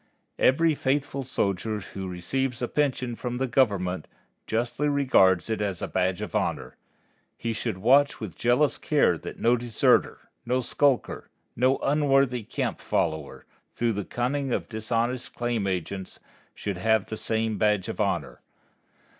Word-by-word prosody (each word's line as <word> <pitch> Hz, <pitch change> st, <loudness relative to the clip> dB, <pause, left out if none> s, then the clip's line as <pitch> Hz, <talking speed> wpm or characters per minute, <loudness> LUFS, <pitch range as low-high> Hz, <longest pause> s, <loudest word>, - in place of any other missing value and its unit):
Every 160 Hz, +5 st, +4 dB
faithful 140 Hz, 0 st, -1 dB
soldier 105 Hz, -3 st, -1 dB
who 95 Hz, 0 st, -7 dB
receives 120 Hz, +8 st, -2 dB
a -, -, +1 dB
pension 130 Hz, -4 st, -1 dB
from 125 Hz, +1 st, -4 dB
the 130 Hz, -, 0 dB
Government 100 Hz, -, +1 dB, 0.4 s
justly 120 Hz, +6 st, 0 dB
regards 110 Hz, -, +4 dB
it 110 Hz, -1 st, -2 dB
as 100 Hz, -4 st, -2 dB
a -, -, -3 dB
badge 90 Hz, 0 st, 0 dB
of -, -, -7 dB
honor. -, -, -2 dB, 0.6 s
He 115 Hz, -1 st, -2 dB
should 105 Hz, -4 st, -3 dB
watch 135 Hz, +8 st, +4 dB
with 105 Hz, -7 st, -6 dB
jealous 125 Hz, +4 st, +2 dB
care -, -, +3 dB
that -, -, -8 dB
no 120 Hz, +1 st, +3 dB
deserter, 120 Hz, -2 st, +1 dB
no 125 Hz, +2 st, 0 dB
skulker, 135 Hz, +1 st, 0 dB, 0.3 s
no 130 Hz, +3 st, +3 dB
unworthy 135 Hz, -4 st, +2 dB
camp 105 Hz, -, -3 dB
follower, 80 Hz, -3 st, -2 dB, 0.3 s
through 115 Hz, -1 st, 0 dB
the 105 Hz, 0 st, -3 dB
cunning 130 Hz, +5 st, -2 dB
of -, -, -1 dB
dishonest 115 Hz, +2 st, -2 dB
claim 120 Hz, -4 st, -1 dB
agents, 95 Hz, +1 st, -4 dB, 0.4 s
should 100 Hz, -3 st, -4 dB
have 110 Hz, +1 st, +2 dB
the 110 Hz, -, -5 dB
same 110 Hz, -1 st, -1 dB
badge 105 Hz, -3 st, +2 dB
of -, -, -3 dB
honor. -, -, -2 dB
120 Hz, 145 wpm, -26 LUFS, 100-130 Hz, 0.6 s, Every